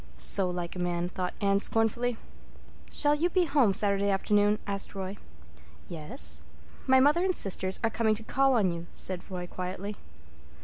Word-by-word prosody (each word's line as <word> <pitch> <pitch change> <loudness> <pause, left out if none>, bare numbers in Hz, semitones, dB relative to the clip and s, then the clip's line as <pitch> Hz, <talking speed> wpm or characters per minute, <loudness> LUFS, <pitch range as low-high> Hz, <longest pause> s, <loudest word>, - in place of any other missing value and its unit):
So 190 -2 +2
like 175 -1 -5
a - - -5
man," 175 0 -1
thought 180 0 -4
Anne 200 -1 +2
scornfully. 225 +3 0 0.7
"Shall 290 -1 +2
you 320 +4 +1
be 360 0 +2
home 280 -9 +3
Saturday 200 0 +2
afternoon?" 205 +1 +2
asked 200 0 -3
Roy. 195 +1 -5 0.7
"Yes." 80 - -2 0.5
"My 260 0 +6
mother 295 +6 +4
and 370 -1 +1
sisters 190 -1 +2
are 225 - +1
coming 220 -1 +1
to 220 - -5
call 270 +4 +2
on 200 -6 +2
you," 170 0 -7
said 185 -2 +1
Roy 180 -2 -5
quietly. 185 +3 -6
200 Hz, 165 wpm, -28 LUFS, 180-235 Hz, 0.7 s, My